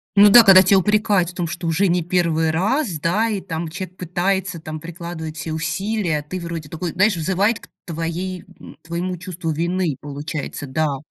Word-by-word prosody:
Ну 205 +1 +8
да. 235 +2 +9
Когда 190 -2 +9
тебя 195 +1 +4
упрекают 205 -3 +2
в - - -10
том, 175 -1 -2
что 170 +1 -5
уже 185 +5 +2
не 175 0 +1
первый 165 -2 +1
раз, 195 - 0
да, 210 +9 +1
и 205 - -1
там 165 -2 -5
человек 180 +2 -7
пытается, 180 +1 -1
там 155 -1 -7
прикладывает 165 -2 -7
все 160 - -4
усилия, 180 +1 -1
а 145 - -8
ты 185 +5 -5
вроде 165 -3 -5
такой 165 +1 -4
знаешь, 200 +2 +3
взывает 190 +7 +1
к - - -16 0.2
твоей 170 +2 -4
к - - -16
твоему 175 +2 -3
чувству 175 -2 -5
вины, 170 0 -1
получается. 145 0 -5
Да. 145 0 0
175 Hz, 190 wpm, -21 LUFS, 160-190 Hz, 0.2 s, да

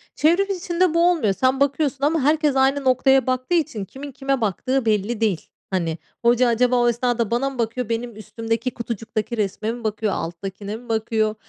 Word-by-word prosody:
çevrim 355 +6 +3
içinde 355 -1 0
bu 340 +1 +4
olmuyor. 220 - +1
Sen 260 +5 +1
bakıyorsun 280 0 0
ama 310 0 +2
herkes 300 -1 +2
aynı 270 +1 +2
noktaya 265 0 +3
baktığı 255 +6 0
için 235 - -1
kimin 275 +7 -9
kime 270 0 -1
baktığı 240 +5 0
belli 215 +1 0
değil. 200 -7 0 0.2
Hani, 170 -4 -1 0.3
hoca 245 +1 +4
acaba 245 +2 +2
o 240 -1 +4
esnada 240 -2 0
bana 255 +4 +1
mı 260 -3 -11
bakıyor, 230 +1 -2
benim 230 0 -3
üstümdeki 225 +2 -3
kutucuktaki 225 0 -4
resme 210 +2 -1
mi 240 -1 -7
bakıyor, 215 -1 -1
alttakine 195 +5 -5
mi 245 +1 -15
bakıyor? 220 -1 0
240 Hz, 180 wpm, -22 LUFS, 220-270 Hz, 0.3 s, bu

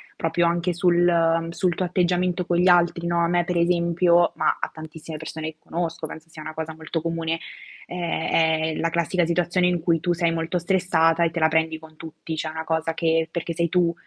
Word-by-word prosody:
proprio 170 +1 0
anche 170 +1 0
sul 170 -2 +3
sul 175 +1 0
tuo 185 - -2
atteggiamento 180 0 0
con 175 0 0
gli 180 +1 +3
altri, 175 -1 +3
no. 170 0 0
A - - +2
me 175 0 +2
per 180 0 -1
esempio, 170 0 +3
ma - - +1
a - - -3
tantissime 160 0 -9
persone 160 0 -5
che - - -42
conosco, 165 -1 -4
penso 160 +1 -10
sia 155 -1 -10
una 155 - -7
cosa 160 0 -5
molto 160 +1 -4
comune, 165 0 -2 0.5
è 175 -2 -3
è 160 -1 +2
la 165 - 0
classica 170 +1 +1
situazione 175 +2 +1
in 175 -2 0
cui 165 0 +2
tu 175 +2 0
sei 170 -1 +1
molto 165 +2 -1
stressata 170 -2 +2
e 165 - +1
te 170 - -3
la 160 - +4
prendi 160 0 0
con 160 0 -15
tutti. 160 0 -8
Cioè 160 - -2
è - - -6
una 160 0 -5
cosa 160 0 -1
che 160 0 +1
perché 170 0 -3
sei 170 0 0
tu 175 0 +2
170 Hz, 220 wpm, -24 LUFS, 160-175 Hz, 0.5 s, la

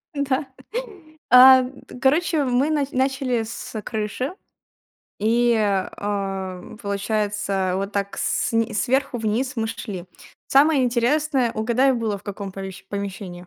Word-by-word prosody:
Да. 280 0 0 0.8
А 255 +1 +9
т 255 -1 -10
короче, 305 +3 +2
мы 255 +4 +2
на 295 -3 +1
начали 260 -3 0
с 220 0 -6
крыши. 220 - -3 0.9
И, 235 +2 +3
а, 195 -2 -2 0.2
получается 200 -2 -1
вот 195 +2 -3
так 200 -1 -2
сн 230 0 0
сверху 260 +3 0
вниз 225 +4 -1
мы 225 -1 -1
шли. 190 -5 -6 0.4
Самое 280 0 +4
интересное, 250 +1 +1
угадай 245 +5 +2
было 220 -4 -1
в 200 - -18
каком 200 -1 -6
помещ 190 -1 -8
помещении? 200 -2 -5
230 Hz, 120 wpm, -23 LUFS, 200-260 Hz, 0.9 s, А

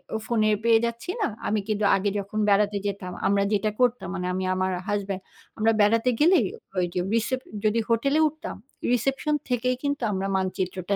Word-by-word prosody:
অ - - +2
ফোনে 215 -3 +2
পেয়ে 230 -1 +5
যাচ্ছি 235 +7 -5
না। - - +2 0.2
আমি 215 0 +1
কিন্তু 215 -1 -1
আগে 200 +1 0
যখন 200 +2 -4
বেড়াতে 205 0 +3
যেতাম, 195 -2 -4 0.2
আমরা 200 0 +3
যেটা 210 +1 +1
করতাম 245 -5 +2
মানে 180 -1 -3
আমি 185 +1 -2
আমার 185 0 0 0.2
হাসব্যান্ড 200 -2 -2 0.4
আমরা 225 +1 +3
বেড়াতে 225 +4 +3
গেলেই 345 +4 +5 0.3
ঐযে, 180 0 0 0.2
রিসেপ 255 +3 0 0.3
যদি 215 +2 +3
হোটেলে 275 +6 +2
উঠতাম 315 +3 -6 0.4
রিসেপশন 270 +5 0 0.2
থেকেই 250 +1 +1
কিন্তু 285 -2 -1
আমরা 195 0 -1
মানচিত্রটা 185 0 -2
215 Hz, 170 wpm, -25 LUFS, 195-245 Hz, 0.4 s, পেয়ে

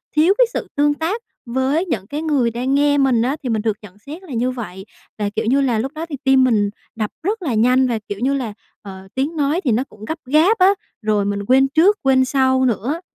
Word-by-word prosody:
thiếu 330 +6 +5
cái - - +6
sự - - -3
tương 290 0 +3
tác 340 +10 -3 0.2
với 265 +8 0
những 225 - -3
cái 295 +5 -4
người 275 -7 +1
đang 255 +4 -1
nghe 285 0 +3
mình 265 -5 +3
á, 260 +4 0
thì 250 - -3
mình 220 -2 0
được 215 -1 -1
nhận 205 -2 -14
xét 300 - -10
là 295 -8 -9
như 245 +2 0
vậy. 195 -6 -7 0.3
Và, 205 -1 -1
kiểu 210 - -3
như 270 +4 +2
là, 245 -5 +1
lúc 265 +5 -3
đó 325 +2 -4
thì 285 - -5
tim 265 -1 +4
mình 215 -5 +2 0.3
đập 215 -2 -3
rất 420 +4 -1
là 285 -9 -2
nhanh 250 +4 +3
và, 230 -3 -1
kiểu 205 - -4
như 265 +4 +1
là, 245 -6 -3 0.3
ờ, 190 -1 -10
tiếng 280 +5 -1
nói 295 +5 +1
thì 255 - +1
nó 240 +4 +1
cũng 215 -5 -13
gấp 315 - -4
gáp 315 - +3
á, 370 -1 +5 0.3
rồi 210 -2 +1
mình 205 0 -1
quên 265 +3 +4
trước 345 +9 +3
quên 260 -1 +4
sau 260 -1 +2
nữa, 255 - -1
260 Hz, 245 wpm, -19 LUFS, 225-295 Hz, 0.3 s, cái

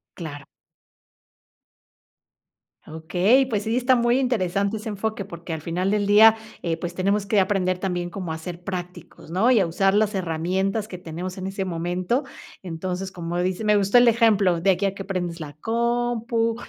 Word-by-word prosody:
Claro. 145 -5 -8 2.4
Okey, 180 +11 +2
pues 215 -5 -2
sí, 225 +2 -1
está 255 +1 +3
muy 240 +2 +2
interesante 200 -4 0
ese 215 - -8
enfoque 215 0 -3
porque 170 -3 -9
al 160 - -3
final 180 +4 -1
del 205 -1 +1
día, 220 +2 +7 0.2
eh, 165 -1 -2
pues 175 +1 -5
tenemos 200 +2 0
que 200 0 +3
aprender 185 -2 0
también 180 -2 -3
como 180 -3 -5
a 160 - -3
ser 175 +1 -8
prácticos, 180 -4 -7
¿no? 215 +8 +3
Y 235 - +5
a 185 - +2
usar 195 +4 +2
las 210 0 +2
herramientas 190 +5 -1
que 185 - -8
tenemos 180 +2 -6
en 185 - -4
ese 195 0 -3
momento. 180 - -1 0.4
Entonces, 185 +2 -4
como 175 -1 -5
dice 185 +4 -1
me 210 - +4
gustó 200 +3 +4
el 245 0 +6
ejemplo 210 -7 +3
de 195 +1 +4
aquí 190 +2 0
a 195 0 -1
que 195 - -6
prendes 175 -3 -4
la 145 -2 -7
compu, 235 0 0
195 Hz, 175 wpm, -23 LUFS, 175-220 Hz, 2.4 s, día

